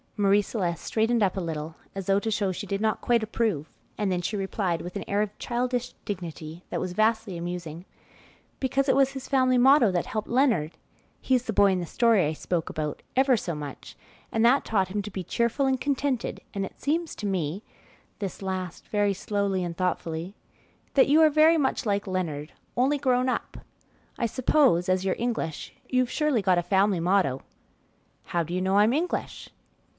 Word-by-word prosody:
Marie 200 0 +4
Celeste 180 -6 -3
straightened 225 0 +1
up 190 -1 +1
a - - -2
little, 160 -1 -4 0.2
as 195 -1 -4
though 195 +1 +3
to 220 - -3
show 205 -3 0
she 205 +3 -6
did 195 0 -2
not 220 -1 0
quite 235 -2 +2
approve, 215 -8 -1 0.3
and 205 -2 0
then 180 -1 0
she 205 +4 -2
replied, 190 -3 -1
with 180 - -8
an 200 - -3
air 200 +1 +1
of 210 -1 -3
childish 245 0 -2
dignity 170 -3 -6
that - - -2
was 180 -1 -3
vastly 215 -2 +1
amusing, 170 -1 -6 0.7
"Because 270 +1 0
it 260 - +4
was 270 0 +4
his 270 -1 -7
family 255 -2 +3
motto 255 -3 +6
that 175 -2 0
helped 220 -4 -3
Leonard 235 - +2 0.5
(he's 255 -2 +1
the 225 - -3
boy 200 0 +5
in 185 - 0
the 175 - -4
story 230 -4 +3
I 155 - -1
spoke 165 +1 -2
about) 150 -1 -4
ever 265 0 +4
so 180 -6 -3
much, 145 -2 -8 0.4
and 225 +1 +2
that 260 +4 +5
taught 195 -4 0
him 205 +2 -2
to 210 - -7
be 190 -1 -4
cheerful 235 - 0
and 260 -1 0
contented, 275 -3 -1
and 195 -1 -2
it - - -12
seems 320 +4 -1
to 210 - -6
me" 185 0 -2 0.6
this 200 -3 -5
last 185 -2 -4
very 205 -1 +1
slowly 200 -2 -1
and 170 -1 -4
thoughtfully 180 0 -2 0.6
"that 270 -1 +5
you 305 +3 +6
are 315 - +7
very 315 +2 +5
much 275 -2 0
like 200 -1 0
Leonard, 165 -5 -3 0.2
only 275 +4 +2
grown 255 -2 +2
up. - - -3 0.6
I 235 - +1
suppose, 250 - +3
as 185 0 +2
you're 190 -1 0
English, 230 -10 -3 0.2
you've 255 -1 +1
surely 300 -7 +1
got 185 -2 +3
a - - -2
family 195 0 +2
motto." 175 -7 +1 0.8
"How 170 -1 -1
do 165 +2 -6
you 185 - 0
know 190 +1 +2
I'm 210 +3 +5
English?" 335 +5 -2
205 Hz, 195 wpm, -26 LUFS, 180-245 Hz, 0.8 s, are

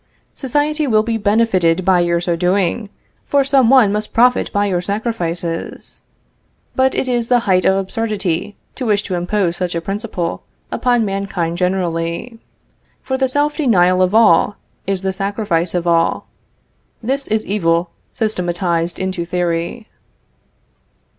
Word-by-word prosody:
Society 295 +3 0
will 215 -3 +3
be 230 0 -1
benefited 200 -5 +2
by 185 -2 +4
your 170 0 +1
so 175 0 -1
doing, 190 +4 0 0.4
for 280 -1 +3
some 270 -3 +3
one 255 -6 +6
must 210 +1 -3
profit 250 +2 +3
by 205 0 +1
your 180 -3 0
sacrifices. 180 -5 -4 0.7
But 265 0 +2
it - - -1
is 240 -2 0
the 245 -1 +3
height 185 -5 +2
of 190 - +4
absurdity 200 -2 -2 0.2
to 255 - -4
wish 210 -1 +2
to 190 - -5
impose 175 0 -1
such 180 -1 -2
a - - 0
principle 195 -2 -4 0.3
upon 245 -3 +1
mankind 195 -4 -3
generally; 180 +4 -2 0.6
for 265 - -2
the 265 0 +1
self 290 +3 0
denial 185 - +3
of 185 +3 +2
all, 210 -2 +5 0.3
is 195 -1 -1
the 190 0 -1
sacrifice 195 -4 -1
of 175 -1 -1
all. 170 -1 +1 0.8
This 270 +4 -1
is 220 0 0
evil 170 -4 0 0.2
systematized 175 -5 -1
into 185 -2 -2
theory. 175 +5 -2
195 Hz, 140 wpm, -18 LUFS, 175-230 Hz, 0.8 s, one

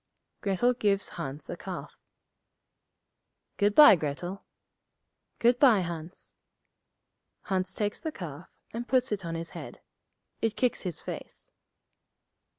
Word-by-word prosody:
Grettel 205 +5 +2
gives 205 -5 +1
Hans 145 -3 -6
a - - -4
calf. - - -7 1.6
'Good 205 0 +2
bye, 295 -9 +10
Grettel.' 175 +5 -4 0.9
'Good 240 +1 +3
bye, 245 -8 +6
Hans.' 170 0 -7 1.1
Hans 185 -1 -1
takes 205 -1 -1
the 320 - -4
calf, 165 - -8 0.2
and 235 +1 -4
puts 255 -1 +2
it 200 -2 -2
on 165 -1 -4
his 165 0 -5
head. - - -9 0.6
It 225 -1 0
kicks 250 -3 +1
his 180 -4 -5
face. - - -8
195 Hz, 120 wpm, -29 LUFS, 170-235 Hz, 1.6 s, bye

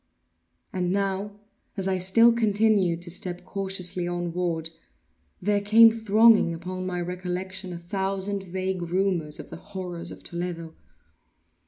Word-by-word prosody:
And 180 -1 -1
now, 200 +1 -2 0.4
as 195 -1 -1
I 190 -1 0
still 230 +6 +5
continued 205 -6 +2
to 170 - -4
step 180 0 -3
cautiously 185 -2 -2
onward, 175 -2 -2 0.7
there 205 +1 +1
came 225 +3 +7
thronging 220 -4 +4
upon 185 +2 -5
my 180 -1 -2
recollection 180 +1 -4
a 175 - -5
thousand 195 +3 -2
vague 190 0 -3
rumors 175 -3 -1
of - - -10
the - - -7
horrors 180 -3 -6
of - - -8
Toledo. 170 -2 -5
185 Hz, 130 wpm, -26 LUFS, 175-200 Hz, 0.7 s, came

